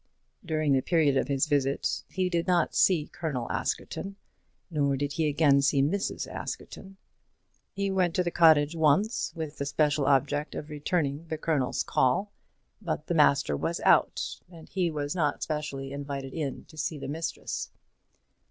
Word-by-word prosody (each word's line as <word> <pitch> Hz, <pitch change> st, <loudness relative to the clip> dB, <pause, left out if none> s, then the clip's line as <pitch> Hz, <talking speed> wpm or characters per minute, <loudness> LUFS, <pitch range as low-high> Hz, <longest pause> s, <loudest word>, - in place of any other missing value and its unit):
During 155 Hz, -4 st, +1 dB
the 135 Hz, -, +3 dB
period 155 Hz, -3 st, +2 dB
of -, -, +1 dB
his 140 Hz, -2 st, +1 dB
visit 140 Hz, -1 st, 0 dB
he 185 Hz, -1 st, -1 dB
did 170 Hz, -1 st, -1 dB
not 180 Hz, -2 st, +2 dB
see 170 Hz, -6 st, +3 dB
Colonel 145 Hz, -9 st, -4 dB
Askerton, 195 Hz, 0 st, -3 dB, 0.6 s
nor 140 Hz, -3 st, +1 dB
did 145 Hz, +1 st, -2 dB
he 160 Hz, 0 st, +1 dB
again 145 Hz, -2 st, +4 dB
see 140 Hz, 0 st, +3 dB
Mrs. 195 Hz, +8 st, -1 dB
Askerton. 195 Hz, 0 st, -7 dB, 0.7 s
He 200 Hz, 0 st, -2 dB
went 180 Hz, -3 st, +1 dB
to 180 Hz, -, +2 dB
the 175 Hz, -, -2 dB
cottage 160 Hz, -2 st, +5 dB
once, 160 Hz, +9 st, +2 dB
with 155 Hz, -2 st, -6 dB
the 140 Hz, -, -1 dB
special 145 Hz, -1 st, +1 dB
object 145 Hz, +2 st, +1 dB
of 150 Hz, 0 st, -6 dB
returning 150 Hz, 0 st, -1 dB
the 160 Hz, -, -3 dB
Colonel's 150 Hz, -5 st, 0 dB
call; 185 Hz, +11 st, +1 dB, 0.5 s
but 160 Hz, -5 st, -3 dB
the 175 Hz, -, -2 dB
master 140 Hz, -, +3 dB
was -, -, -2 dB
out, -, -, +2 dB
and 165 Hz, -3 st, -13 dB
he 180 Hz, -3 st, 0 dB
was 145 Hz, -2 st, -3 dB
not 150 Hz, -5 st, 0 dB
specially 145 Hz, -3 st, -4 dB
invited 140 Hz, -1 st, -5 dB
in 150 Hz, -5 st, -4 dB
to 155 Hz, -, -17 dB
see 155 Hz, -, -2 dB
the 140 Hz, -, -6 dB
mistress. 160 Hz, +4 st, -4 dB
150 Hz, 160 wpm, -28 LUFS, 140-170 Hz, 0.7 s, cottage